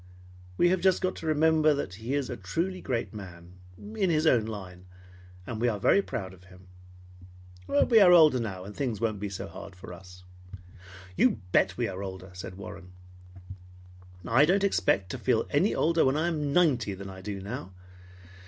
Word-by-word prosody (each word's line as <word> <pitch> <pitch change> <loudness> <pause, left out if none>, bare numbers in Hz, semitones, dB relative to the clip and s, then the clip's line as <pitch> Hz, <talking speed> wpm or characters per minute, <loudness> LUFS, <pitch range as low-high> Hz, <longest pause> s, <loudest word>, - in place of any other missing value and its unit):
We 175 - +4
have 185 0 +1
just 190 0 +3
got 185 0 -1
to 165 - -6
remember 155 0 +3
that 120 -9 -4
he 115 +7 -4
is 140 -3 -1
a - - -5
truly 170 - -3
great 120 -3 -3
man 90 -3 -11 0.2
in 210 -3 -2
his 155 -1 +1
own 120 -8 +4
line, 95 -4 -8 0.6
and 110 +1 -5
we 120 - +2
are 105 -4 -1
very 200 - +4
proud 95 - -6
of 90 -1 -18
him. 90 0 -17 1.0
We 220 - +4
are 190 -3 +7
older 155 -7 +6
now, 95 -5 -5
and 100 +2 -10
things 125 -7 -2
won't 110 -3 -1
be 105 0 -4
so 95 0 -6
hard 100 -1 -10
for 90 0 -10
us." 90 0 -14 0.9
"You 120 - +2
bet - - +2
we - - 0
are 95 0 -6
older!" 95 -1 -7
said 90 0 -8
Warren. 95 -1 -10 1.3
"I 125 +5 +4
don't 190 +6 +3
expect 95 - +1
to - - -5
feel - - +1
any - - +2
older 165 +1 +2
when 135 +2 +2
I 165 +3 +1
am 150 -4 -2
ninety 130 - +2
than 95 0 -8
I 95 0 -10
do 100 0 -5
now. 100 -1 -7
110 Hz, 190 wpm, -28 LUFS, 95-155 Hz, 1.3 s, are